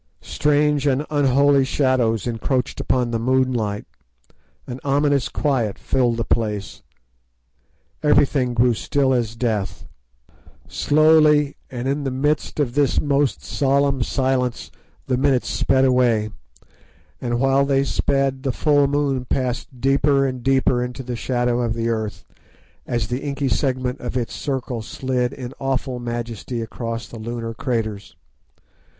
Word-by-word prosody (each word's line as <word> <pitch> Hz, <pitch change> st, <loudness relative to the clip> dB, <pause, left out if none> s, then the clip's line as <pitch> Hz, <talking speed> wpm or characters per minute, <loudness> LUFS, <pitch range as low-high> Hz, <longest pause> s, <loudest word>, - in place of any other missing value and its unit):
Strange 150 Hz, -1 st, +1 dB
and 140 Hz, +2 st, +1 dB
unholy 140 Hz, -1 st, +4 dB
shadows 130 Hz, -6 st, +1 dB
encroached 125 Hz, +2 st, -2 dB
upon 125 Hz, -2 st, 0 dB
the 115 Hz, -, -1 dB
moonlight, 120 Hz, -4 st, 0 dB, 0.8 s
an 125 Hz, +1 st, -7 dB
ominous 140 Hz, -1 st, +1 dB
quiet 125 Hz, -9 st, -1 dB
filled 120 Hz, -3 st, 0 dB
the 115 Hz, -, 0 dB
place. 105 Hz, -4 st, -2 dB, 1.2 s
Everything 140 Hz, -4 st, +2 dB
grew 120 Hz, +1 st, +4 dB
still 135 Hz, +4 st, +1 dB
as 115 Hz, -3 st, -1 dB
death. 110 Hz, -4 st, -2 dB, 0.8 s
Slowly 150 Hz, -1 st, +4 dB
and 125 Hz, 0 st, -4 dB
in 140 Hz, +2 st, -1 dB
the 135 Hz, -, -1 dB
midst 145 Hz, +4 st, -1 dB
of 130 Hz, -5 st, 0 dB
this 145 Hz, -1 st, +2 dB
most 140 Hz, -2 st, 0 dB
solemn 140 Hz, -1 st, +1 dB
silence 130 Hz, -1 st, -1 dB, 0.3 s
the 125 Hz, -, 0 dB
minutes 135 Hz, -1 st, +2 dB
sped 135 Hz, 0 st, +2 dB
away, 120 Hz, -4 st, +2 dB, 0.9 s
and 120 Hz, -1 st, -1 dB
while 135 Hz, +1 st, +3 dB
they 140 Hz, -1 st, +2 dB
sped 135 Hz, -1 st, 0 dB
the 135 Hz, -1 st, -1 dB
full 145 Hz, +2 st, +3 dB
moon 140 Hz, -2 st, 0 dB
passed 125 Hz, 0 st, -3 dB
deeper 135 Hz, +1 st, +3 dB
and 130 Hz, -2 st, -3 dB
deeper 130 Hz, -1 st, +2 dB
into 125 Hz, +1 st, -6 dB
the 125 Hz, -1 st, -4 dB
shadow 120 Hz, 0 st, 0 dB
of 115 Hz, -1 st, -1 dB
the 115 Hz, 0 st, -1 dB
earth, 110 Hz, -2 st, -3 dB, 0.6 s
as 120 Hz, -2 st, -1 dB
the 125 Hz, +3 st, -3 dB
inky 140 Hz, -1 st, -2 dB
segment 130 Hz, +2 st, -1 dB
of 125 Hz, +1 st, -4 dB
its 120 Hz, -2 st, -3 dB
circle 130 Hz, -4 st, -3 dB
slid 125 Hz, +2 st, -2 dB
in 130 Hz, -2 st, -7 dB
awful 135 Hz, -1 st, -2 dB
majesty 120 Hz, 0 st, -4 dB
across 115 Hz, 0 st, -5 dB
the 115 Hz, -, -10 dB
lunar 115 Hz, 0 st, -5 dB
craters. 110 Hz, -4 st, -3 dB
130 Hz, 135 wpm, -21 LUFS, 120-140 Hz, 1.2 s, unholy